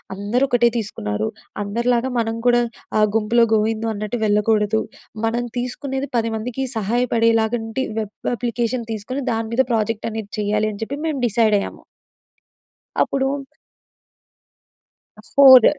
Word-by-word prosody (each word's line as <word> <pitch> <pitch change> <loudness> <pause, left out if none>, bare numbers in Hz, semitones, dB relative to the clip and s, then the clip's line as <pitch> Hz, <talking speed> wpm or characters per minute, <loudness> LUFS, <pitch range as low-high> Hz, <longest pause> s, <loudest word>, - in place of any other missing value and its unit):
అందరూ 205 +6 0
ఒకటే 240 -1 +4
తీసుకున్నారు. 105 - -2 0.4
అందరిలాగా 235 +4 0
మనం 225 -1 -1
కూడా 240 0 +5 0.4
ఆహ్, 215 0 +5
గుంపులో 225 +2 +4
గోవిందో 220 +1 +1
అన్నట్టు 215 +3 -3
వెళ్ళకూడదు. 210 +1 +2 0.4
మనం 235 +2 0
తీసుకునేది 265 +3 -3
10 230 -1 0
మందికి 250 +4 -3
సహాయపడేలాగంటి 225 +1 +1 0.2
వెబ్ 210 -1 -4 0.2
అప్లికేషన్ 240 0 -2
తీసుకొని, 255 +6 -4
దాని 225 0 -1
మీద 250 - +4
ప్రాజెక్ట్ 220 0 0
అనేది 220 -2 -6
చేయాలి 210 +1 +1
అని 205 - -10
చెప్పి 270 +5 -4
మేము 300 -4 -1
డిసైడ్ 220 -1 +3
అయ్యాము. - - -6 1.2
అప్పుడు 270 -1 +1 2.1
ఫోర్ 260 -4 +9
225 Hz, 120 wpm, -21 LUFS, 215-245 Hz, 2.1 s, ఫోర్